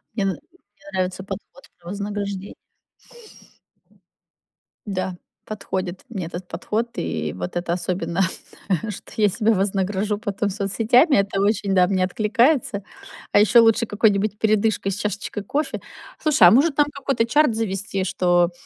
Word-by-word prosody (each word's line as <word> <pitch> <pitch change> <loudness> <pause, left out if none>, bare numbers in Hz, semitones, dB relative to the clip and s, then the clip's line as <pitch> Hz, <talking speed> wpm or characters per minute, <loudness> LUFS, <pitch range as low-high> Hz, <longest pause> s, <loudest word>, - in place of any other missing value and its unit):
Мне 205 - 0
н - - +2
мне 195 +5 -16
нравится 185 0 -2
подход 205 +7 -9
про 175 -1 -17
вознаграждение. 200 0 -4 2.3
Да, 185 -2 -3 0.3
подходит 190 -3 -4
мне 190 -7 -4
этот 175 +2 -7
подход, 230 +3 -2
и 75 - -2
вот 90 0 -6
это 175 0 -1
особенно, 175 0 -2 0.7
что 205 - -9
я 210 -1 +4
себя 220 +3 +2
вознагражу 200 +1 0
потом 205 -2 -2
соцсетями, 225 - +3
это 195 0 +1
очень, 200 -1 +1
да, 180 -1 +5
мне 185 -1 +1
откликается. 220 - +1 0.5
А - - +5
ещё 225 +3 +6
лучше 225 +1 +3
какой-нибудь 205 -1 +1
передышкой 215 -2 +1
с 195 - -4
чашечкой 210 0 -3
кофе. 295 +9 -2 0.4
Слушай, 310 -2 +6
а - - +7
может 280 +5 +4
там 295 0 +4
какой-то 270 -4 0
чарт 290 -1 +3
завести, 195 -3 -2
что 180 -2 +2
200 Hz, 140 wpm, -22 LUFS, 185-220 Hz, 2.3 s, а